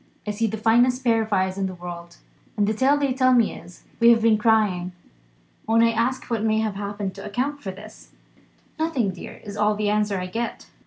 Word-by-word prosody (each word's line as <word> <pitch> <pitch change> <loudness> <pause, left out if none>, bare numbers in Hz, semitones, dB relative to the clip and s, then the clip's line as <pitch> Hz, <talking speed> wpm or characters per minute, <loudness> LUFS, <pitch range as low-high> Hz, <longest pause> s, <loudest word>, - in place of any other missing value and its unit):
I 210 - -2
see 225 +2 -1
the 220 +1 -4
finest 240 +4 +3
pair 230 -2 +3
of 220 0 -5
eyes 190 -1 0
in 195 - 0
the 185 - -7
world; 175 -1 -9 0.4
and 205 - +3
the 215 - 0
tale 265 +6 +3
they 280 -2 0
tell 255 0 +3
me 235 -3 +3
is, 175 - -13 0.2
We 235 0 +6
have 230 -1 +5
been 220 -2 +4
crying. 210 -5 +2 0.7
When 225 +1 +4
I 230 - +4
ask 235 +3 -1
what 230 -3 -2
may 220 0 +1
have 220 -1 0
happened 200 -1 -4
to 195 - -8
account 260 +8 -3
for 195 - -5
this 210 +3 -11 0.7
'Nothing, 285 -11 0
dear,' 180 - -10
is 205 -1 -8
all 210 0 +2
the 210 0 0
answer 210 -1 0
I 180 - -4
get. 230 +6 -4
215 Hz, 220 wpm, -23 LUFS, 200-235 Hz, 0.7 s, We